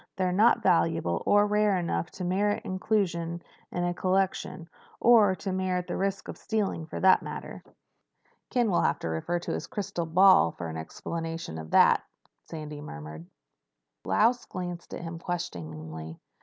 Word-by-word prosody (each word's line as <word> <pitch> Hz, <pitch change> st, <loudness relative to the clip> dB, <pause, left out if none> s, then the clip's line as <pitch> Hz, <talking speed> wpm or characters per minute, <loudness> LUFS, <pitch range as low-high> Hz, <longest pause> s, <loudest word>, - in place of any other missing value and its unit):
They're 185 Hz, -1 st, 0 dB
not 220 Hz, +4 st, +4 dB
valuable 165 Hz, -, +2 dB
or 205 Hz, 0 st, +5 dB
rare 210 Hz, -1 st, +2 dB
enough 170 Hz, -1 st, -2 dB
to 185 Hz, -, -6 dB
merit 200 Hz, +3 st, 0 dB
inclusion 175 Hz, -4 st, -1 dB, 0.3 s
in 175 Hz, -, -2 dB
a 175 Hz, 0 st, 0 dB
collection—or 190 Hz, +3 st, +1 dB
to 190 Hz, -, -4 dB
merit 185 Hz, -1 st, -1 dB
the -, -, -4 dB
risk 195 Hz, 0 st, -2 dB
of -, -, -8 dB
stealing, 200 Hz, -7 st, -2 dB
for -, -, -6 dB
that 190 Hz, 0 st, +5 dB
matter." -, -, -7 dB, 0.9 s
"Ken 240 Hz, -4 st, +1 dB
will 175 Hz, -, +3 dB
have -, -, +1 dB
to 80 Hz, -, -4 dB
refer 80 Hz, -, -1 dB
to 170 Hz, -, -5 dB
his -, -, -3 dB
crystal 195 Hz, -8 st, -3 dB
ball 180 Hz, -, +6 dB
for 85 Hz, -2 st, -6 dB
an 80 Hz, -, -6 dB
explanation 165 Hz, -, -5 dB
of 80 Hz, 0 st, -8 dB
that," -, -, +5 dB, 0.5 s
Sandy 150 Hz, -2 st, -7 dB
murmured. 75 Hz, -, -9 dB, 0.8 s
Lausch 230 Hz, -, +2 dB
glanced 175 Hz, -2 st, -6 dB
at -, -, -7 dB
him 165 Hz, 0 st, -6 dB
questioningly. 80 Hz, -, -6 dB
175 Hz, 155 wpm, -28 LUFS, 150-195 Hz, 0.9 s, ball